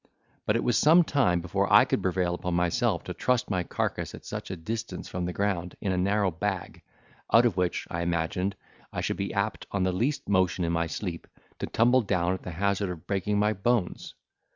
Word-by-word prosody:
But 105 - +3
it 115 - +1
was 120 - +2
some 165 +4 +6
time 120 - +2
before 95 +3 -1
I - - +8
could - - 0
prevail 90 -1 0
upon 90 0 -2
myself 85 -1 +1
to - - -5
trust 125 -4 0
my 90 -2 +1
carcase - - -3
at - - -13
such - - -6
a 95 - -3
distance 110 +7 -5
from 90 -1 -3
the 90 - -2
ground, 90 -2 -2
in 100 - -1
a 90 - 0
narrow 100 +1 +2
bag, 95 +2 -3 0.5
out 115 +2 +6
of 120 - +2
which, 90 -1 0
I 85 - -3
imagined, 85 +3 -1 0.4
I - - -3
should - - -2
be 100 0 -2
apt, 100 +1 -2
on 100 -2 -1
the 95 - +2
least 135 +10 -1
motion 95 -2 +2
in 85 - 0
my 85 0 0
sleep, 85 0 -5 0.3
to - - -3
tumble 125 +3 +4
down 90 -4 0
at 95 - -5
the - - -7
hazard 100 +3 0
of 85 -3 -7
breaking 105 +1 0
my 105 +1 +2
bones. 105 -1 -1
95 Hz, 215 wpm, -27 LUFS, 90-105 Hz, 0.5 s, I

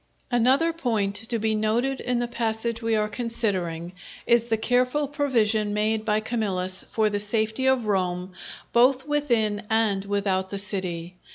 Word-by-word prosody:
Another 260 +8 +3
point 225 -10 -1 0.2
to 235 - 0
be 220 0 0
noted 230 +5 0
in 250 -1 -1
the 240 0 -1
passage 230 0 -2
we 225 -1 +1
are 210 0 +1
considering, 190 -8 -2 0.3
is 235 -1 +3
the 225 -2 0
careful 250 +5 +1
provision 225 -8 +1
made 215 +1 0
by 215 0 +2
Camillus 190 -5 -1
for 215 -1 +1
the 205 - -1
safety 220 +4 0
of 260 -3 +3
Rome 185 -2 -1 0.4
both 255 +3 +4
within 235 -9 +1
and 220 -3 +2
without 195 -2 0
the 200 - -4
city. 185 -3 -4
220 Hz, 155 wpm, -25 LUFS, 205-240 Hz, 0.4 s, both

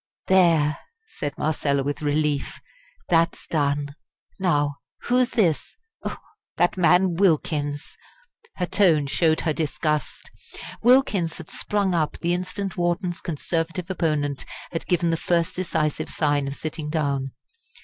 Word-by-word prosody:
"There!" 165 -5 +4 0.3
said 145 0 -5
Marcella, 140 -3 0
with 145 +2 -3
relief, 150 -1 0 0.5
"that's 165 +1 +2
done. 145 -2 0 0.5
Now, 145 -6 +1 0.2
who's 250 0 +2
this? 195 - +1 0.8
That 175 - +3
man 180 0 +4
Wilkins!" 150 -5 0 0.6
Her 180 - -1
tone 170 -6 +3
showed 160 +3 +2
her 160 - 0
disgust. 150 -3 -2 0.5
Wilkins 225 -9 +3
had 170 - -9
sprung 200 -3 0
up 160 -3 0
the 170 0 0
instant 185 +2 -3
Wharton's 175 0 -1
Conservative 165 +2 -2
opponent 150 -6 -1 0.3
had 165 - -4
given 175 -2 +2
the 165 - +1
first 170 +2 0
decisive 155 -4 -1
sign 145 -2 +1
of 140 - -4
sitting 155 0 -5
down. 140 -4 -1
165 Hz, 120 wpm, -24 LUFS, 145-180 Hz, 0.8 s, There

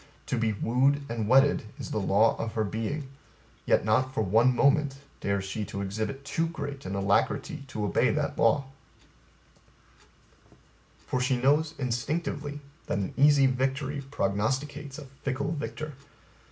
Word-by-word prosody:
To - - -1
be 115 -2 +1
wooed 130 +7 +2
and 115 -2 -2
wedded 135 +4 +5 0.2
is - - -7
the - - 0
law 105 +3 +3
of 115 -1 -3
her 110 - +1
being, 115 +8 -3 0.6
yet - - +3
not 130 +5 +2
for 110 - +1
one 115 +6 +4
moment 140 +1 +3 0.2
dares 100 -1 -1
she 105 +3 -3
to 100 +1 -5
exhibit 110 +8 -4
too 165 +4 0
great 140 - -6
an 95 - -3
alacrity 100 - 0
to 110 -5 -3
obey 100 - +2
that - - -1
law; 140 - +3 2.4
for 130 - -1
she 125 0 +2
knows 145 +5 +2
instinctively 145 +3 -2 0.3
that - - -1
an 100 -2 -2
easy 140 0 +6
victory 135 +2 0
prognosticates 135 +6 -2
a 150 - -8 0.2
fickle 135 +3 -2
victor. 150 +1 -4
130 Hz, 145 wpm, -28 LUFS, 110-145 Hz, 2.4 s, easy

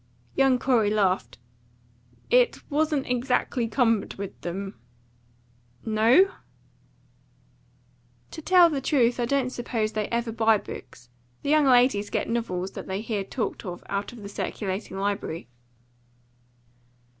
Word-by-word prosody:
Young 270 -2 +3
Corey 245 -5 +2
laughed. 200 -3 0 0.9
"It - - +3
wasn't 300 -1 +1
exactly 250 -1 0
cumbered 225 -2 +1
with 200 -1 -7
them." 195 +3 -5 1.1
"No?" 235 - +4 2.0
"To 320 - -8
tell 350 0 +6
the 280 -3 -2
truth, 250 -4 +2
I 240 - +1
don't 260 0 0
suppose 230 -3 -2
they 215 -1 -2
ever 235 0 -2
buy 225 -1 +3
books. 120 - -10 0.3
The 285 - 0
young 305 -1 +5
ladies 245 -5 +4
get - - -1
novels 195 -6 -2
that - - -8
they 190 +2 -3
hear 215 -3 -2
talked 220 +4 -4
of 175 -2 -7
out 200 0 -2
of 235 -4 -11
the 200 - -7
circulating 195 -1 -4
library." 195 - -3
230 Hz, 125 wpm, -26 LUFS, 200-260 Hz, 2.0 s, tell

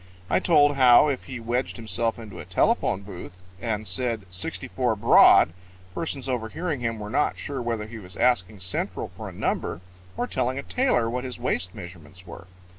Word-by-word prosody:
I - - +4
told 145 -4 +4
how, 130 +3 +7
if 135 - -3
he 130 -3 -7
wedged 120 +3 -2
himself 115 +1 -1
into 105 -6 -10
a - - -7
telephone 95 - +1
booth 90 -3 -9 0.3
and 110 -2 -2
said, 110 +2 -1
"64 90 0 -1
Broad," 80 - +6 0.4
persons 140 - -3
overhearing 130 +6 -3
him 115 -1 -2
were 105 0 -7
not 150 - +1
sure 140 -3 -4
whether 115 -3 -2
he 110 +1 -9
was 90 -2 -11
asking 105 -5 +1
Central 90 0 -2
for - - -8
a - - -9
number 80 - -2 0.4
or - - 0
telling 125 +1 -1
a 140 - -4
tailor 250 - +1
what 125 +2 -3
his 130 -1 -5
waist 90 -7 -1
measurements 90 -1 -11
were. 85 +1 -11
115 Hz, 180 wpm, -25 LUFS, 95-130 Hz, 0.4 s, how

